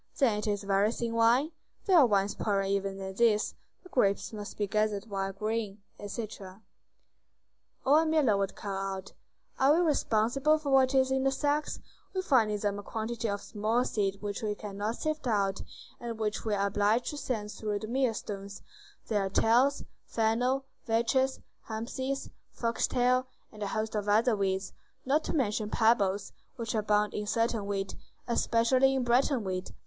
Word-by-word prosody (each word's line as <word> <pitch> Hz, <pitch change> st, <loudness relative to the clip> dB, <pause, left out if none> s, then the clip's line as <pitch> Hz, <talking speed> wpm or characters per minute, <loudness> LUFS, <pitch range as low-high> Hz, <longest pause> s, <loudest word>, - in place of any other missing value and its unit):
"Then 230 Hz, -7 st, +3 dB
it 210 Hz, -, -4 dB
is 205 Hz, -1 st, -1 dB
very 200 Hz, +2 st, +2 dB
thin 235 Hz, -1 st, -3 dB
wine?" 235 Hz, +7 st, +3 dB, 0.3 s
"There 370 Hz, -4 st, +6 dB
are 270 Hz, -, +7 dB
wines 200 Hz, -2 st, +2 dB
poorer 200 Hz, -2 st, 0 dB
even 195 Hz, 0 st, -1 dB
than 190 Hz, 0 st, -5 dB
these. 215 Hz, 0 st, +2 dB, 0.3 s
The 365 Hz, -, -14 dB
grapes 200 Hz, -, +1 dB
must 205 Hz, -1 st, -7 dB
be 210 Hz, -, 0 dB
gathered 215 Hz, +1 st, 0 dB
while 195 Hz, -1 st, -1 dB
green." 210 Hz, 0 st, -3 dB, 0.2 s
Etc. 205 Hz, -2 st, -7 dB, 1.3 s
Or 290 Hz, +4 st, +6 dB
a -, -, +1 dB
miller 300 Hz, -9 st, +3 dB
would 195 Hz, -1 st, -1 dB
call 200 Hz, -2 st, -5 dB, 0.2 s
out:— 190 Hz, 0 st, -9 dB, 0.5 s
"Are 275 Hz, +3 st, +5 dB
we -, -, +3 dB
responsible 275 Hz, +1 st, +2 dB
for 295 Hz, -3 st, -4 dB
what 265 Hz, 0 st, +4 dB
is 265 Hz, 0 st, +3 dB
in 265 Hz, 0 st, +1 dB
the 270 Hz, -, +3 dB
sacks? 290 Hz, +2 st, -1 dB, 0.4 s
We 375 Hz, -, 0 dB
find 250 Hz, -10 st, +4 dB
in 210 Hz, -1 st, -1 dB
them 205 Hz, -1 st, -1 dB
a -, -, -5 dB
quantity 225 Hz, +2 st, -3 dB
of 200 Hz, 0 st, -2 dB
small 225 Hz, +4 st, 0 dB
seed 200 Hz, -3 st, -1 dB
which 205 Hz, -1 st, -3 dB
we 210 Hz, -2 st, -1 dB
cannot 210 Hz, +2 st, -4 dB
sift 310 Hz, -1 st, -3 dB
out, 200 Hz, -4 st, +1 dB, 0.4 s
and 235 Hz, -2 st, -5 dB
which 215 Hz, 0 st, -2 dB
we 215 Hz, -2 st, +1 dB
are 200 Hz, 0 st, +1 dB
obliged 205 Hz, +4 st, +1 dB
to 295 Hz, -, -7 dB
send 220 Hz, -7 st, -3 dB
through 210 Hz, -1 st, -3 dB
the 215 Hz, -, -6 dB
mill 250 Hz, -1 st, +1 dB
stones; 200 Hz, -2 st, -7 dB, 0.4 s
there 210 Hz, -3 st, +1 dB
are -, -, -5 dB
tares, 245 Hz, +8 st, +3 dB, 0.2 s
fennel, 245 Hz, +4 st, +1 dB, 0.2 s
vetches, 260 Hz, +4 st, +1 dB, 0.3 s
hempseed, 260 Hz, +5 st, -3 dB, 0.2 s
fox 230 Hz, -1 st, -1 dB
tail, 255 Hz, +1 st, +2 dB, 0.2 s
and 215 Hz, -, -13 dB
a 205 Hz, -, -1 dB
host 215 Hz, +2 st, -2 dB
of 210 Hz, -1 st, -2 dB
other 225 Hz, +3 st, +4 dB
weeds, 190 Hz, -1 st, -1 dB, 0.3 s
not 290 Hz, +4 st, +2 dB
to -, -, -2 dB
mention 215 Hz, -6 st, 0 dB
pebbles, 205 Hz, -4 st, +2 dB, 0.2 s
which 230 Hz, -4 st, -4 dB
abound 210 Hz, -1 st, +1 dB
in 210 Hz, 0 st, -3 dB
certain 230 Hz, -1 st, 0 dB
wheat, 195 Hz, -1 st, -2 dB, 0.3 s
especially 255 Hz, +3 st, +3 dB
in 260 Hz, -, 0 dB
Breton 245 Hz, +1 st, +2 dB
wheat. 185 Hz, -1 st, -4 dB
220 Hz, 175 wpm, -30 LUFS, 205-255 Hz, 1.3 s, are